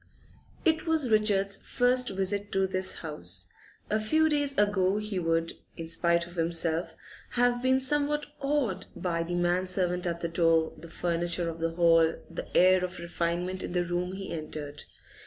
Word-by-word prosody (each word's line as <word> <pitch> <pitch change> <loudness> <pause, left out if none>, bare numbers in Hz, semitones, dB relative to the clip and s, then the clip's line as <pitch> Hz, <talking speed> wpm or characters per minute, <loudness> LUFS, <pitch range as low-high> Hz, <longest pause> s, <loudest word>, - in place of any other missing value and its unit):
It 320 0 +2
was 310 -7 +1
Richard's 200 -2 +3
first 250 0 +1
visit 195 +1 -1
to 195 0 +2
this 185 0 0
house. 150 -1 -2 0.4
A 215 - 0
few 315 +9 +2
days 290 -2 0
ago 205 -1 +2
he 210 -3 -3
would, 165 -1 0 0.2
in 165 - -6
spite 170 +1 +2
of 175 - -13
himself, 165 0 0 0.4
have 245 0 +2
been 260 +1 +3
somewhat 295 +2 +1
awed 275 -10 -1
by 170 -3 -2
the 175 +1 -3
man 175 +1 +1
servant 180 -1 +1
at 170 0 -3
the 170 - -1
door, 165 -1 +2
the 170 - -12
furniture 175 +1 -1
of 165 0 -5
the 165 0 -2
hall, 165 -1 +4 0.2
the 165 - -4
air 185 0 +5
of 180 0 -4
refinement 175 +2 -2
in - - -5
the 180 -1 +1
room 175 +1 -2
he 195 0 -6
entered. 150 -2 -6
180 Hz, 170 wpm, -28 LUFS, 170-215 Hz, 0.4 s, air